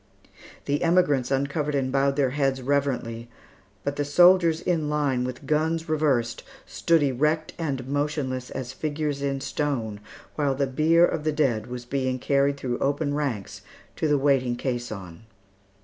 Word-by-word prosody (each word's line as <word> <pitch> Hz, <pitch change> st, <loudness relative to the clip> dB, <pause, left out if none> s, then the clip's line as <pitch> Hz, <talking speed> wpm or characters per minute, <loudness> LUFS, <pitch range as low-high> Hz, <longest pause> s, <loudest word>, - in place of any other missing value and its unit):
The 145 Hz, +1 st, 0 dB
emigrants 165 Hz, -7 st, +2 dB
uncovered 145 Hz, +2 st, -1 dB
and 130 Hz, -2 st, 0 dB
bowed 135 Hz, 0 st, +2 dB
their 135 Hz, -3 st, +1 dB
heads 135 Hz, -1 st, 0 dB
reverently, 125 Hz, -4 st, -1 dB, 0.5 s
but 140 Hz, 0 st, -3 dB
the 145 Hz, -, +1 dB
soldiers 170 Hz, +2 st, +5 dB
in 165 Hz, -4 st, -1 dB
line, 145 Hz, -4 st, 0 dB
with 125 Hz, +2 st, -6 dB
guns 160 Hz, +3 st, 0 dB
reversed, 140 Hz, -7 st, +1 dB, 0.2 s
stood 165 Hz, -3 st, +2 dB
erect 150 Hz, +4 st, 0 dB
and 135 Hz, -6 st, -3 dB
motionless 140 Hz, -3 st, -2 dB
as 130 Hz, 0 st, -5 dB
figures 150 Hz, 0 st, -3 dB
in 135 Hz, -1 st, -1 dB
stone, 130 Hz, -7 st, -2 dB, 0.3 s
while 145 Hz, -3 st, 0 dB
the 140 Hz, +1 st, +1 dB
bier 160 Hz, +6 st, +4 dB
of 160 Hz, -3 st, -2 dB
the 155 Hz, -, +1 dB
dead 130 Hz, -8 st, 0 dB
was 125 Hz, 0 st, -7 dB
being 130 Hz, 0 st, -1 dB
carried 140 Hz, +2 st, +1 dB
through 125 Hz, -3 st, -3 dB
open 145 Hz, +1 st, 0 dB
ranks 135 Hz, -10 st, -3 dB, 0.4 s
to 155 Hz, -, 0 dB
the 150 Hz, -1 st, +3 dB
waiting 135 Hz, -3 st, +2 dB
caisson. 110 Hz, -7 st, -5 dB
140 Hz, 150 wpm, -25 LUFS, 130-150 Hz, 0.5 s, soldiers